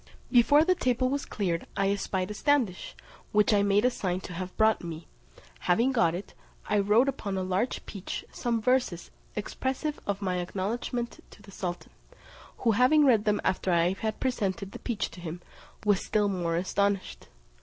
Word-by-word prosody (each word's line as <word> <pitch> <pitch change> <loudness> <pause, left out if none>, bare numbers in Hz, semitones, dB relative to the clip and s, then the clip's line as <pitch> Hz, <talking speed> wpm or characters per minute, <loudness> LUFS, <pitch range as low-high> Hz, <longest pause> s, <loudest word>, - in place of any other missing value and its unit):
Before 285 +5 +6
the 370 - +4
table 255 -5 +1
was 280 +1 -2
cleared, 175 -5 -2
I 195 0 +2
espied 190 -1 -2
a - - -3
standish, 240 -6 0 0.4
which 210 +1 +4
I 205 - +4
made 200 +2 +3
a 250 - +4
sign 185 -6 -2
to 180 - -8
have 185 +1 -6
brought 220 -2 +3
me; 165 -1 -6 0.5
having 235 +9 +2
got 225 -10 +2
it, 190 - -7 0.3
I 210 - +2
wrote 210 +6 +4
upon 205 -8 -2
a 190 - -1
large 185 +7 -1
peach 195 -2 -6
some 235 -2 -1
verses 250 -9 +1 0.2
expressive 265 +7 -3
of 200 -1 -1
my 185 -3 -1
acknowledgment 215 +7 -3
to 205 - -17
the 195 - -13
sultan; 180 -2 -5 0.7
who 230 - +2
having 255 +7 +5
read 225 -6 +4
them 210 -1 +2
after 185 0 0
I 170 +1 +3
had 215 +2 -3
presented 200 -7 -1
the - - -8
peach 225 -4 -2
to 180 - -11
him, 170 0 -6 0.5
was 205 -2 +3
still 210 -1 +1
more 175 -3 -1
astonished. 195 +2 -1
205 Hz, 175 wpm, -28 LUFS, 185-240 Hz, 0.7 s, Before